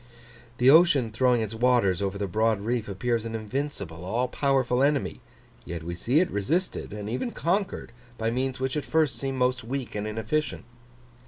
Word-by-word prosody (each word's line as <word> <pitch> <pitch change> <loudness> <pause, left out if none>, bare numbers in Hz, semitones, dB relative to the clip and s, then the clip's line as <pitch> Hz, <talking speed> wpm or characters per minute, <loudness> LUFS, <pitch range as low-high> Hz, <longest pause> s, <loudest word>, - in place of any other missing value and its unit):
The 125 +2 +6
ocean 145 -8 +5
throwing 125 +1 +3
its 110 0 -3
waters 115 -6 +2
over 100 0 -1
the 100 - -1
broad 110 +3 +1
reef 115 0 -2
appears 115 +3 -1
an 115 0 -4
invincible, 110 - -4
all 115 +7 0
powerful 130 -1 +1
enemy; 140 0 +1 0.4
yet 85 -1 -6
we 85 +1 -4
see 120 - +2
it 180 - +1
resisted, 155 - -1
and 105 0 -6
even 125 - -2
conquered, 195 - -1 0.3
by 115 0 0
means 130 +2 -1
which 130 +1 -1
at 150 - -1
first 155 -3 +1
seem 135 -1 -3
most 125 -1 +1
weak 130 +2 -4
and 105 0 -3
inefficient. 110 +8 -2
120 Hz, 175 wpm, -27 LUFS, 110-135 Hz, 0.4 s, The